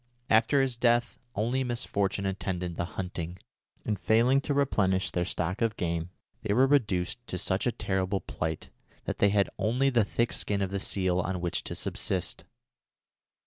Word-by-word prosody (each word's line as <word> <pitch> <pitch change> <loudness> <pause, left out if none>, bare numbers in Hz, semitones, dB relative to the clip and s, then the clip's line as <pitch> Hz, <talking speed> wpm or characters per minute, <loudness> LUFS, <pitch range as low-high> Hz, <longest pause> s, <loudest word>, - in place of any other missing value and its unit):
After 115 +5 +5
his 130 -3 -1
death 120 0 +2 0.2
only 120 +6 +1
misfortune 100 -5 -1
attended 90 -2 -2
the 85 - -1
hunting, 90 -2 -4 0.5
and, 105 -3 -1
failing 120 +7 +4
to 145 - -1
replenish 95 -10 +2
their 90 0 0
stock 90 +2 -1
of 115 -2 +1
game, 85 -1 -2 0.3
they 105 -1 0
were 130 +3 +6
reduced 120 -5 +1
to 90 - -3
such 95 +5 0
a - - +3
terrible 95 -2 -1
plight 80 -1 -4 0.3
that - - -3
they 100 - +5
had 100 -1 +2
only 125 +5 +2
the 120 -3 +4
thick 115 +4 0
skin 100 -1 -1
of 95 - -3
the 100 - -1
seal 95 -2 0
on 95 0 -1
which 85 0 -1
to - - -4
subsist. - - -2
100 Hz, 170 wpm, -29 LUFS, 90-120 Hz, 0.5 s, were